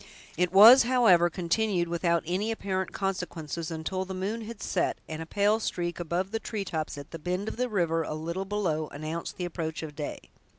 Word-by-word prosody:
It 180 +1 +1
was, 220 +7 +10
however, 230 -9 +5
continued 180 +1 0
without 170 0 +1
any 185 +6 -1
apparent 190 -3 -2
consequences, 170 -5 -3
until 165 +3 -3
the 190 0 -6
moon 205 +5 -3
had 230 -1 -8
set, 185 -2 -1
and 160 0 -5
a 160 - -6
pale 205 +4 +2
streak 175 -5 -3
above 175 +3 -2
the 225 - -1
treetops, 190 -10 -4
at 145 0 -9
the 165 - -7
bend 180 +6 -2
of - - -4
the 250 0 0
river 170 -6 +1
a 155 - -4
little 170 +5 -3
below, 180 -7 -1
announced 155 +4 -5
the 180 - -2
approach 165 -2 -4
of 150 -2 -7
day. 150 -1 -4
180 Hz, 195 wpm, -28 LUFS, 165-200 Hz, -, was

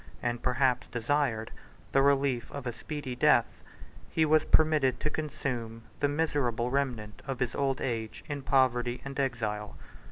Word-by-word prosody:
and 120 -1 -1
perhaps 125 -1 +1
desired, 120 -2 0 0.4
the 135 - +4
relief 135 -3 +2
of 140 -2 -6
a 120 - -2
speedy 145 -1 -5
death, 120 - +3 0.5
he 160 - +2
was 155 0 +4
permitted 155 -5 +3
to 150 - -1
consume 120 -7 -4 0.2
the 145 - +3
miserable 140 -6 0
remnant 120 -6 -2
of 135 -2 -3
his 125 -2 -1
old 135 -2 0
age 115 -3 -3
in 145 -1 -4
poverty 125 -2 +2
and 135 0 -5
exile. 110 -6 -2
130 Hz, 150 wpm, -30 LUFS, 120-140 Hz, 0.5 s, the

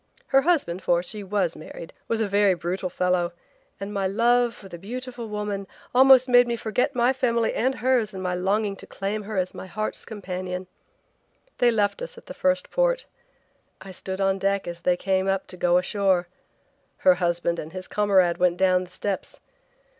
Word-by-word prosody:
Her 270 - +5
husband, 275 - +1
for 175 -1 +2
she 210 +2 -6
was 190 -3 0
married, 165 +1 -10
was 225 -1 0
a 220 - +1
very 200 -1 +3
brutal 175 +2 -3
fellow 180 -1 0 0.5
and 200 +1 -5
my 195 -2 0
love 235 +4 +2
for 195 - -13
the 175 -2 -9
beautiful 240 +3 -6
woman 210 -2 -3 0.3
almost 260 0 +7
made 245 -1 +6
me 235 - 0
forget 225 +2 -1
my 245 +2 +3
family 235 -3 +1
and 260 +3 0
hers 245 -4 +1
in 190 - -7
my 180 -1 -2
longing 195 +3 0
to - - -12
claim 200 +2 -3
her 210 0 -6
as 185 -1 -1
my - - -8
heart's 215 +4 -4
companion. 185 -3 -5 0.9
They 245 - +5
left 210 - +1
us - - -7
at 475 - -13
the - - -8
first 275 0 0
port. - - +1 0.7
I 190 - -10
stood 190 +1 -6
on 195 0 +1
deck 195 0 0
as 170 0 -6
they 180 0 +2
came 190 0 0
up 195 0 0
to 185 - -10
go 175 0 +3
ashore. 185 -1 +1 0.7
Her 185 - +5
husband 175 -1 -1
and 155 - -7
his 185 +1 -7
comrade 190 -4 +2
went 180 -1 +3
down 185 -1 +3
the - - -18
steps. 195 +1 -4
195 Hz, 190 wpm, -25 LUFS, 180-230 Hz, 0.9 s, almost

